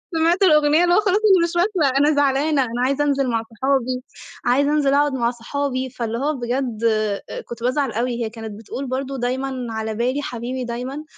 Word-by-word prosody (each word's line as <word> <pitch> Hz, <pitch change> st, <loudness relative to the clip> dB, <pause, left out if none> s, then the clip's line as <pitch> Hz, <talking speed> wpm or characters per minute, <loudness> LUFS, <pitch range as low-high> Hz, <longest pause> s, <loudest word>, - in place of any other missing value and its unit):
سمعت 335 Hz, +4 st, +2 dB
الأغنية 305 Hz, -2 st, +5 dB
اللي 350 Hz, 0 st, +4 dB
هو -, -, +5 dB
خلاص 420 Hz, -, -1 dB
أنا 400 Hz, -5 st, +4 dB
مش 340 Hz, 0 st, -2 dB
واكلة 345 Hz, -7 st, +2 dB
أنا 295 Hz, +2 st, +3 dB
زعلانة 285 Hz, +1 st, +2 dB
أنا 240 Hz, -1 st, -2 dB
عايزة 275 Hz, +2 st, +1 dB
أنزل 280 Hz, -2 st, +1 dB
مع 230 Hz, -1 st, 0 dB
صحابي، 255 Hz, +2 st, -1 dB, 0.4 s
عايزة 280 Hz, +4 st, +3 dB
أنزل 290 Hz, -2 st, +2 dB
أقعد 290 Hz, 0 st, +3 dB
مع 235 Hz, -2 st, +1 dB
صحابي، 260 Hz, +2 st, -3 dB
فاللي 230 Hz, -1 st, -4 dB
هو 290 Hz, +5 st, 0 dB
بجد 245 Hz, -2 st, -2 dB
آآ 215 Hz, -2 st, -2 dB
كنت 235 Hz, 0 st, -8 dB
بازعل 255 Hz, +1 st, 0 dB
أوي، 240 Hz, +1 st, -2 dB
هي -, -, -3 dB
كانت 225 Hz, -1 st, -8 dB
بتقول 240 Hz, +5 st, -6 dB
برضو 265 Hz, +2 st, -3 dB
دايمًا 255 Hz, 0 st, -2 dB
على 220 Hz, -1 st, -3 dB
بالي 250 Hz, +5 st, 0 dB
حبيبي 250 Hz, -1 st, -4 dB
دايمًا، 250 Hz, +5 st, -5 dB
265 Hz, 195 wpm, -21 LUFS, 240-290 Hz, 0.4 s, الأغنية